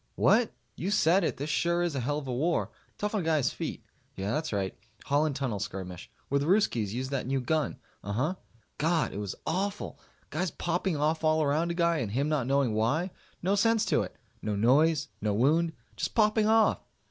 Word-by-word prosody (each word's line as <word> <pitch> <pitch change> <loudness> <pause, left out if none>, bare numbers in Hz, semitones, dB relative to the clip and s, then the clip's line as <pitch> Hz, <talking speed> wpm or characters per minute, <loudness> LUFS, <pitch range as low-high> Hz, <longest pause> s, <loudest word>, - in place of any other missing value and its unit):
What? - - +4 0.2
You 175 +9 -3
said 195 -2 +4
it! - - -1
This 145 +3 -3
sure 170 +2 +1
is 175 -3 0
a 135 - -1
hell 140 +4 -1
of 145 -3 -5
a 125 - -2
war. 160 +7 0 0.3
Tough 210 +1 -2
on 210 - +1
a - - -4
guy's 155 -4 +2
feet. - - -5 0.3
Yeah, 95 +2 -2
that's 155 +4 -1
right. 100 -3 -1 0.3
Holland 145 0 +2
Tunnel 130 -7 -2
skirmish. 95 -3 -6 0.2
Where 140 - +1
the 140 - -1
Ruskies 125 - +2
used 130 +4 -3
that 135 -3 -2
new 135 0 +1
gun. 155 +4 0 0.3
Uhuh. 125 - -1 0.4
God! 165 +1 +1
It 100 - -4
was 100 -3 -4
awful. 200 +4 -2 0.3
Guys 170 +5 -1
popping 175 +1 -1
off 155 +2 0
all 155 0 +3
around 155 +4 +1
a 170 - -2
guy 170 -1 +2
and 110 -7 -2
him 140 +4 +1
not 145 -6 0
knowing 135 -4 +2
why. 145 - +1 0.3
No 190 +3 +2
sense 225 +2 +3
to - - +4
it. - - -6 0.3
No 105 -1 -1
noise. 140 +9 +3
No 105 -1 0
wound. 160 +8 +3 0.2
Just - - -3
popping 215 -1 +4
off. 220 0 +4
150 Hz, 205 wpm, -29 LUFS, 125-170 Hz, 0.4 s, What